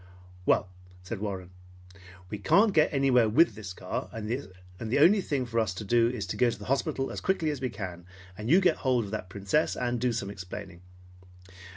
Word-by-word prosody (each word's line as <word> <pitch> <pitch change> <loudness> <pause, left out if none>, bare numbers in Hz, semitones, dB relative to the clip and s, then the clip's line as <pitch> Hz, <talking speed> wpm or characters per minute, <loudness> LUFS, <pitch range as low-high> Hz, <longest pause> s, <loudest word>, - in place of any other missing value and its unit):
"Well," - - +3 0.4
said 95 +3 -5
Warren, 95 -3 -5 0.8
"we 105 - -4
can't 200 - +4
get 155 -3 +4
anywhere 130 -5 +3
with 165 +10 +4
the 105 -4 -8
car, - - -4
and 110 -1 -6
the 105 -2 -4
only 180 +8 +6
thing 140 -7 -1
for 115 -1 -1
us 105 -5 0
to 100 - -5
do 115 +2 +3
is 120 -5 -4
to 90 - -5
go 125 - +4
to 115 - -4
the 105 - -10
hospital 135 0 -1
as - - -5
quickly 165 -5 +1
as 145 -3 -5
we 130 - -1
can, 90 -5 -7 0.3
and 105 +3 -5
you 180 +5 +6
get 175 -4 +3
hold 125 -4 +1
of 100 - -9
that 105 -4 -4
Princess, 100 +10 0
and 120 -1 -2
do 125 -1 +2
some 105 -4 -3
explaining. 95 -1 -8
115 Hz, 205 wpm, -28 LUFS, 100-135 Hz, 0.8 s, only